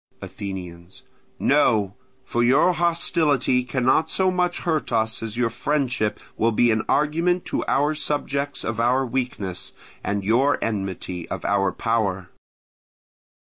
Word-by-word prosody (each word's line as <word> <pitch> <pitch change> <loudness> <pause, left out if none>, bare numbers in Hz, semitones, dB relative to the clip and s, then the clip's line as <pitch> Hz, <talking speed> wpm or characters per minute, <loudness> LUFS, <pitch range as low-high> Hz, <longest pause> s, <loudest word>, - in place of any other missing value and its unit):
Athenians. 90 -2 -8 0.3
No; 110 -9 +2 0.3
for 120 - -1
your 135 +9 +4
hostility 155 -6 +2
cannot 130 +5 +1
so 185 -1 +2
much 180 -1 0
hurt 160 -5 -1
us 110 -1 0
as 115 0 -5
your 120 -2 +1
friendship 125 -4 -1 0.2
will 115 +1 +2
be 120 +2 +3
an 110 0 +1
argument 165 +5 +1
to - - -2
our 145 +2 +2
subjects 145 -1 -2
of 110 0 -3
our 125 +3 +2
weakness, 120 -8 -4 0.3
and 100 -1 -2
your 125 +8 +3
enmity 95 -5 -4
of - - -5
our 100 -1 +2
power. 100 -5 -1
120 Hz, 130 wpm, -23 LUFS, 105-145 Hz, 0.3 s, your